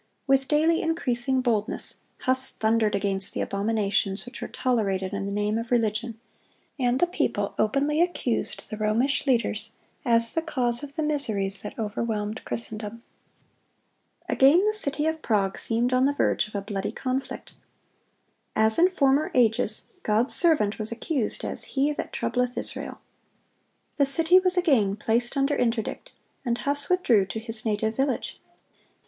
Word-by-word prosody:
With 270 -1 +2
daily 320 +2 +2
increasing 265 -5 0
boldness, 225 -4 -1 0.2
Huss 260 0 +4
thundered 220 -1 0
against 195 -1 0
the - - -2
abominations 200 -1 -1
which 245 - -10
were - - -4
tolerated 195 -7 -1
in 200 0 -3
the - - -4
name 210 +2 -1
of 230 0 -6
religion; 225 -1 -1 0.6
and 250 0 +1
the - - +4
people 205 - -2
openly 280 +8 +1
accused 345 -9 -2
the 215 - -5
Romish 230 +8 0
leaders 225 -3 0 0.3
as 230 -1 +4
the 325 - 0
cause 250 -7 0
of 285 -1 -9
the 315 - -2
miseries 215 -10 +1
that 210 - -8
overwhelmed 215 0 -3
Christendom. 225 0 -4 1.2
Again 300 +9 +4
the 425 - +1
city 300 -7 +1
of 320 0 -2
Prague 200 -6 0
seemed 240 +2 0
on 255 +1 +3
the 285 +1 0
verge 215 - +1
of 215 - -14
a 200 - -3
bloody 200 -1 -4
conflict. 260 +1 -5 1.0
As 220 +3 +6
in 360 +2 +5
former 285 -4 +1
ages, 235 -1 +2 0.2
God's 225 -1 +1
servant 295 - +3
was 215 +1 +1
accused 240 +1 -2
as - - -1
"he 285 +2 +2
that - - -6
troubleth 250 0 -2
Israel."(132) - - -6
The 285 - +3
city 330 +6 +5
was 370 0 +1
again 255 - +2
placed 235 +5 -1
under 275 +1 +1
interdict, 235 - -2 0.3
and 240 -2 -1
Huss 285 +1 0
withdrew 245 - +2
to 220 - -5
his 225 -1 -4
native 220 +1 -1
village. 270 0 -2
240 Hz, 155 wpm, -25 LUFS, 215-280 Hz, 1.2 s, As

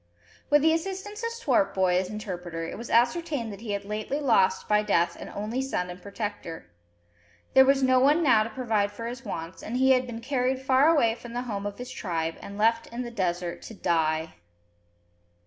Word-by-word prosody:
With 295 0 +5
the 320 0 +5
assistance 390 +5 -4
of 465 - -1
Swartboy, 200 - +1
as 185 0 -1
interpreter, 180 -6 -5
it 165 - -5
was 235 +2 -8
ascertained 245 -1 +1
that 200 - -11
he 220 -3 -4
had 200 0 -3
lately 215 +7 -3
lost 195 -9 +2
by 210 0 +4
death 195 -5 +1
an - - -9
only 220 +5 -2
son 180 -10 -2
and 180 +1 -10
protector. 200 -5 -6 0.9
There 265 - +8
was 275 0 +3
no 255 0 +5
one 295 +6 +4
now 255 -7 +5
to 215 - -2
provide 220 -4 0
for 230 +3 -7
his 245 +3 -6
wants, 165 -5 -6
and 235 +3 -4
he 265 +1 +4
had 255 -1 +3
been 230 -2 -6
carried 255 +1 0
far 265 +2 +4
away 285 -9 +4
from 235 0 -10
the 245 +1 -2
home 205 -4 -4
of 205 - -7
his 250 +1 -7
tribe, 165 -7 -2
and 200 - -8
left 230 +2 +2
in 240 +2 -5
the 240 - -6
desert 175 -5 -2
to 225 - -10
die! 160 -3 0
230 Hz, 200 wpm, -27 LUFS, 195-260 Hz, 0.9 s, There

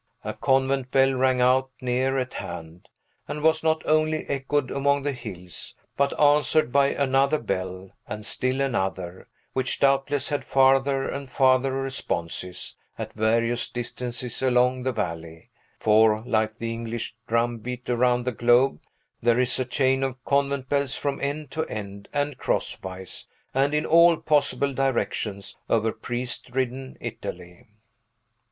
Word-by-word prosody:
A - - -3
convent 135 -1 +1
bell 135 0 +4
rang 130 -1 +2
out 130 +1 +3
near 130 +1 0
at 130 -1 -2
hand, 80 +1 -8 0.4
and 150 0 -5
was 160 0 +3
not 160 0 +1
only 155 0 +2
echoed 140 0 -1
among 140 0 +1
the 145 - 0
hills, 90 - -7 0.2
but 140 0 0
answered 150 -1 +4
by 140 +1 +4
another 140 +2 +2
bell, 95 -4 -4 0.2
and 105 0 -6
still 130 +4 0
another, 95 -8 -2 0.3
which 130 0 -1
doubtless 140 0 +2
had 145 - -1
farther 135 0 +3
and 140 -1 -5
farther 130 0 +3
responses, 90 -9 -3 0.2
at - - -6
various 115 +2 +1
distances 120 0 -4
along 125 0 +3
the 130 +1 0
valley; 80 -7 -5 0.3
for, 110 0 +4
like 110 -2 +1
the 115 -1 -3
English 115 0 -4
drumbeat 120 +1 -1
around 125 0 +2
the 125 - 0
globe, 120 +3 +3 0.4
there 120 +1 +3
is 125 0 +1
a 130 - 0
chain 130 +1 +1
of 130 -1 -3
convent 140 -1 +1
bells 140 -1 0
from 140 -1 -2
end 145 0 -3
to 160 - -1
end, 100 -1 -7
and 145 -2 -2
crosswise, 95 0 -3 0.3
and 140 +3 +2
in 150 - +1
all 170 0 +6
possible 140 -2 +1
directions 115 -6 -2
over 110 0 +2
priest 120 +1 -5
ridden 130 +1 -3
Italy. 90 0 -7
130 Hz, 140 wpm, -25 LUFS, 115-140 Hz, 0.4 s, all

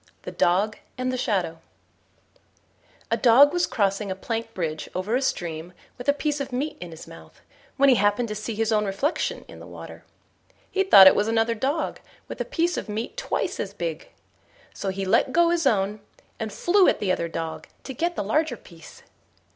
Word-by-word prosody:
THE - - -6
DOG 200 +5 +1 0.2
AND 255 0 -2
THE - - 0
SHADOW 190 -10 -1 1.5
A - - +2
Dog 270 +4 +6
was 350 0 +1
crossing 200 0 0
a 190 - -2
plank 225 +3 -4
bridge 155 -4 -3
over 190 +6 -1
a 260 - +1
stream 170 -8 -3 0.3
with 245 - -3
a - - +6
piece 295 0 -2
of 275 -1 -5
meat 275 +5 -2
in 175 - -6
his 160 0 -11
mouth, 80 -1 -14 0.4
when 280 - +5
he 265 - +7
happened 205 +4 +2
to - - -3
see 215 +1 -5
his 225 +1 0
own 210 -1 +2
reflection 200 - -2
in - - -12
the - - -11
water. - - -11 0.7
He 385 - +1
thought 195 - +9
it 190 - +9
was 205 - +1
another 225 0 +1
dog 275 +8 -2 0.3
with - - -6
a - - -2
piece 350 -7 0
of - - -5
meat 220 - -4
twice - - -2
as - - -4
big; - - -5 0.6
so 195 - -4
he 195 0 -3
let 225 +6 +2
go 340 0 +4
his 335 -4 +1
own, 205 -2 +1 0.4
and 220 -1 -4
flew 370 - +3
at - - +2
the 195 -3 0
other 170 -2 -1
dog 165 -1 -5 0.2
to 265 - -7
get 340 +7 -1
the - - -2
larger 270 +5 0
piece. 165 -5 -15
225 Hz, 200 wpm, -24 LUFS, 195-280 Hz, 1.5 s, thought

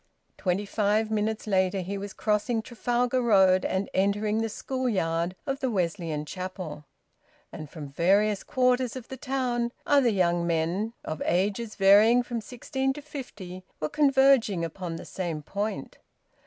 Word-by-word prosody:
Twenty 190 +2 -1
five 215 +1 +1
minutes 215 0 -1
later 190 -2 +1
he 190 +3 -4
was 200 0 -5
crossing 215 +3 0
Trafalgar 245 +2 0
Road 190 -5 +5
and 190 +1 -1
entering 210 +3 +1
the 225 - -1
school 260 +3 -2
yard 170 -3 0
of 270 -2 -2
the 260 - 0
Wesleyan 170 -6 -2
Chapel. 180 -4 -6 0.7
And 155 -2 -8
from 150 -3 -8
various 195 +6 +2
quarters 250 -1 +1
of 255 -2 -8
the 265 - -5
town, 250 -3 -1
other 280 -4 +4
young 175 -4 +1
men, 170 +7 0
of 155 -1 -4
ages 205 +5 0
varying 210 +5 +6
from 240 -1 -4
sixteen 265 +3 -2
to 295 - -8
fifty, 205 -11 -8 0.2
were 155 - -2
converging 270 - +4
upon 170 0 -5
the - - -8
same 170 -5 -4
point. 205 +7 -4
205 Hz, 150 wpm, -27 LUFS, 185-240 Hz, 0.7 s, varying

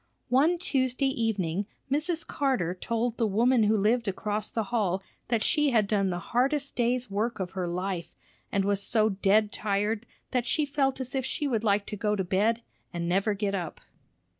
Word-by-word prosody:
One 295 +8 +4
Tuesday 270 -5 0
evening, 200 -7 -1 0.2
Mrs. 315 +3 0
Carter 255 -12 0
told 230 +5 -2
the 225 - +2
woman 235 +4 +3
who 215 +1 +3
lived 225 +3 +2
across 210 +2 -2
the 225 - -1
hall 195 -4 0 0.2
that 230 -2 +1
she 300 -2 +3
had 225 -5 +3
done 195 -2 +1
the 175 - -1 0.2
hardest 275 +3 +1
day's 245 -2 0
work 220 +3 -1
of 185 -1 -3
her 185 -2 -3
life, 180 -1 -3 0.4
and 195 -1 +1
was 200 0 +1
so 215 +1 +2
dead 205 +2 +3
tired 210 +2 -1 0.2
that 250 -1 0
she 300 +5 +2
felt 275 -2 0
as 260 -1 -5
if 265 -1 0
she 290 +3 -2
would 230 -5 0
like 200 -1 +2
to - - -5
go 210 0 0
to 195 - -1
bed 215 +6 +1 0.3
and 170 0 -3
never 195 +4 +1
get 200 0 -1
up. 175 -5 -3
220 Hz, 190 wpm, -28 LUFS, 195-250 Hz, 0.4 s, One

